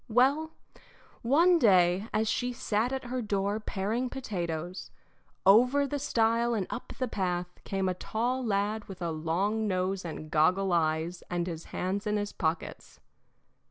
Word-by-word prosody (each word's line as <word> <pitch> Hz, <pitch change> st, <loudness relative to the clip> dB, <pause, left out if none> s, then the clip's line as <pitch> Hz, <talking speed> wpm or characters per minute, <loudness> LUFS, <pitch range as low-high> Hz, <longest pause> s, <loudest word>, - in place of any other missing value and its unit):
Well, 275 Hz, +7 st, +3 dB, 0.7 s
one 335 Hz, +8 st, +4 dB
day, 185 Hz, -, +4 dB
as 220 Hz, +1 st, +1 dB
she 245 Hz, +3 st, 0 dB
sat 225 Hz, +1 st, 0 dB
at 265 Hz, 0 st, -3 dB
her 250 Hz, +1 st, -3 dB
door 205 Hz, -1 st, -1 dB
paring 220 Hz, +4 st, -2 dB
potatoes, 180 Hz, -9 st, -4 dB, 0.6 s
over 250 Hz, +8 st, +6 dB
the 285 Hz, +1 st, -3 dB
stile 235 Hz, -2 st, +2 dB
and 200 Hz, -4 st, -1 dB
up 250 Hz, -, -6 dB
the 255 Hz, -, -1 dB
path 180 Hz, -4 st, -1 dB, 0.2 s
came 195 Hz, -1 st, -1 dB
a 185 Hz, -, +1 dB
tall 240 Hz, +7 st, -2 dB
lad 210 Hz, 0 st, 0 dB
with 190 Hz, -2 st, -10 dB
a 170 Hz, -, -1 dB
long 185 Hz, +8 st, 0 dB
nose 185 Hz, 0 st, -1 dB
and 155 Hz, -2 st, -7 dB
goggle 180 Hz, +5 st, +3 dB
eyes 165 Hz, +1 st, 0 dB
and 175 Hz, -1 st, -1 dB
his 165 Hz, -2 st, -6 dB
hands 195 Hz, +3 st, -3 dB
in 210 Hz, 0 st, +1 dB
his 205 Hz, 0 st, -3 dB
pockets. 160 Hz, 0 st, -3 dB
205 Hz, 155 wpm, -29 LUFS, 180-240 Hz, 0.7 s, over